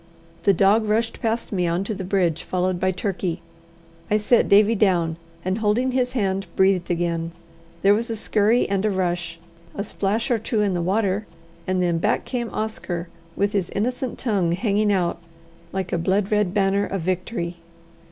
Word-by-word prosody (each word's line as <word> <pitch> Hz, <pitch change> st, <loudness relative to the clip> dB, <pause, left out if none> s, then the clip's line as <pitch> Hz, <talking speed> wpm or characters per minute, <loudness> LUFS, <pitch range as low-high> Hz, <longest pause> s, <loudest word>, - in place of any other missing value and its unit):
The 200 Hz, -, +7 dB
dog 200 Hz, +4 st, +4 dB
rushed 225 Hz, +2 st, 0 dB
past 230 Hz, +1 st, -1 dB
me 180 Hz, -4 st, 0 dB
on 170 Hz, +3 st, 0 dB
to 215 Hz, -, -3 dB
the 195 Hz, -, -5 dB
bridge, 180 Hz, -4 st, +1 dB
followed 185 Hz, 0 st, -1 dB
by 185 Hz, -, +1 dB
Turkey. 185 Hz, -2 st, -2 dB, 0.7 s
I 210 Hz, -, +3 dB
set 215 Hz, +3 st, +3 dB
Davie 210 Hz, +2 st, +6 dB
down, 175 Hz, -6 st, +2 dB, 0.3 s
and, 185 Hz, +3 st, 0 dB
holding 225 Hz, +5 st, +1 dB
his 250 Hz, 0 st, 0 dB
hand, 195 Hz, -5 st, -1 dB
breathed 190 Hz, -2 st, +3 dB
again. 170 Hz, -1 st, -1 dB, 0.5 s
There 200 Hz, +1 st, +6 dB
was 230 Hz, +3 st, -1 dB
a 225 Hz, -, -2 dB
scurry 215 Hz, +2 st, +2 dB
and 195 Hz, 0 st, 0 dB
a 215 Hz, -, +2 dB
rush, 175 Hz, -3 st, -1 dB, 0.4 s
a 200 Hz, -, -2 dB
splash 215 Hz, +4 st, -1 dB
or 235 Hz, -, +2 dB
two 220 Hz, 0 st, -1 dB
in 200 Hz, -2 st, +1 dB
the 175 Hz, -, -1 dB
water, 200 Hz, +2 st, 0 dB, 0.4 s
and 185 Hz, -1 st, +1 dB
then 170 Hz, -2 st, +1 dB
back 210 Hz, +6 st, +1 dB
came 240 Hz, -3 st, -3 dB
Oscar 180 Hz, -5 st, -4 dB, 0.3 s
with 200 Hz, +1 st, +1 dB
his 195 Hz, -4 st, -1 dB
innocent 250 Hz, +4 st, -2 dB
tongue 195 Hz, -8 st, +1 dB
hanging 205 Hz, +2 st, +1 dB
out 175 Hz, -3 st, 0 dB, 0.5 s
like 190 Hz, -2 st, -3 dB
a 175 Hz, -, +1 dB
blood 190 Hz, +4 st, +1 dB
red 210 Hz, -3 st, +2 dB
banner 200 Hz, 0 st, +1 dB
of 195 Hz, -, -3 dB
victory. 180 Hz, 0 st, -2 dB
195 Hz, 180 wpm, -23 LUFS, 180-215 Hz, 0.7 s, The